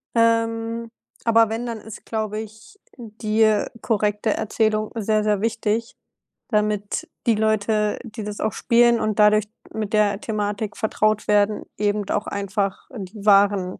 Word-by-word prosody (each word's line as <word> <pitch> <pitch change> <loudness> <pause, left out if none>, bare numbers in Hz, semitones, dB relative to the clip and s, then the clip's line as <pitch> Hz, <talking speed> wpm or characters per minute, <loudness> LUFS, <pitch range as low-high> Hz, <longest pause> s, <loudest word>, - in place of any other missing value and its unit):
ähm, 230 0 +1 0.3
aber 230 -1 +5
wenn, 230 +2 -3
dann 230 -2 -4
ist, 220 -1 -11
glaube 215 -1 -3
ich, 220 - -12 0.2
die, 220 -2 -2
äh, 215 -1 +3 0.2
korrekte 210 -1 0
Erzählung 215 0 0
sehr, 215 -1 +1
sehr 210 -2 +1
wichtig, 225 +1 -1 0.5
damit 210 -2 -1 0.2
die 230 - +4
Leute, 215 0 +1
die 220 -2 -7
das 210 0 -6
auch 215 - -1
spielen 235 0 +3
und 215 -1 -1
dadurch 210 0 +5 0.3
mit 215 -1 -4
der 210 -1 +2
Thematik 210 -1 -3
vertraut 215 -1 0
werden, 210 0 +2
eben 205 0 0
d - - -2
auch 205 - -1
einfach 200 0 -2
die 200 -1 -8
wahren 200 -2 +4
215 Hz, 150 wpm, -22 LUFS, 210-225 Hz, 0.5 s, aber